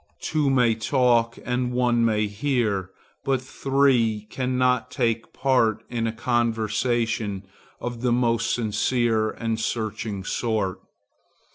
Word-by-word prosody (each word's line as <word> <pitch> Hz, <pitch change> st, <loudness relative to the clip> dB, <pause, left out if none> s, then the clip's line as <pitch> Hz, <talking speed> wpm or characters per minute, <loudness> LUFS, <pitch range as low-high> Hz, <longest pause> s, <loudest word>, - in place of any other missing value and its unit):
Two 150 Hz, -3 st, 0 dB
may 125 Hz, -4 st, +4 dB
talk 115 Hz, 0 st, +2 dB
and 125 Hz, 0 st, -1 dB
one 120 Hz, -1 st, +2 dB
may 110 Hz, -2 st, +2 dB
hear, 105 Hz, -3 st, -1 dB, 0.3 s
but 135 Hz, -1 st, +1 dB
three 130 Hz, -5 st, +1 dB
cannot 125 Hz, -1 st, +1 dB
take 115 Hz, -4 st, -1 dB
part 125 Hz, -5 st, +1 dB
in 115 Hz, -2 st, -1 dB
a -, -, -1 dB
conversation 115 Hz, -3 st, 0 dB, 0.4 s
of 120 Hz, -1 st, -5 dB
the 125 Hz, -1 st, +1 dB
most 115 Hz, -1 st, +1 dB
sincere 115 Hz, 0 st, +1 dB
and 115 Hz, 0 st, -3 dB
searching 110 Hz, -3 st, -3 dB
sort. 105 Hz, -3 st, -1 dB
115 Hz, 115 wpm, -24 LUFS, 110-125 Hz, 0.4 s, may